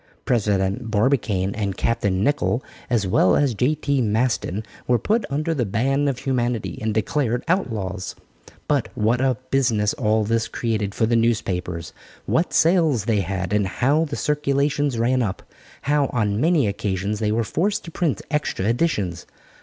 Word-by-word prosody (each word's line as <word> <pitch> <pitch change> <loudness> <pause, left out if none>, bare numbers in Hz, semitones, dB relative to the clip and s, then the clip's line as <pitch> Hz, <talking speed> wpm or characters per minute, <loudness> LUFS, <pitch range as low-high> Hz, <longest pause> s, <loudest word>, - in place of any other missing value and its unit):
President 105 0 0
Barbicane 105 -4 +1
and 100 -3 -3
Captain 100 -5 0
Nicholl 140 -2 +1 0.3
as 115 -4 +1
well 95 -1 +3
as 140 -4 +2
J.T. 140 +3 +1
Maston, 110 -2 0 0.2
were 125 - +4
put 220 - 0
under 155 +4 -1
the 135 -6 0
ban 135 +7 +1
of 135 -3 0
humanity 125 -4 -2
and 110 0 0
declared 120 +3 0
outlaws. 105 - -2 0.5
But - - +1
what 115 +4 +1
a 130 -3 +2
business 115 -6 +2
all 110 -2 +1
this 115 +2 0
created 110 -4 -2
for 110 - +2
the 115 +1 +1
newspapers. 90 -7 -1 0.3
What 165 - +1
sales 160 - +3
they 110 -3 +2
had, 95 0 -2
and 105 -2 +2
how 140 - +1
the 145 -2 -5
circulations 145 -2 0
ran 125 +3 +2
up; 100 -5 -3 0.4
how 145 -1 +2
on 105 -3 0
many 160 -3 +3
occasions 100 0 -2
they 105 -1 0
were 115 +2 +1
forced 190 - -1
to 165 - -8
print 155 - -1
extra 150 -10 -1
editions. 110 - 0
115 Hz, 155 wpm, -22 LUFS, 105-140 Hz, 0.5 s, were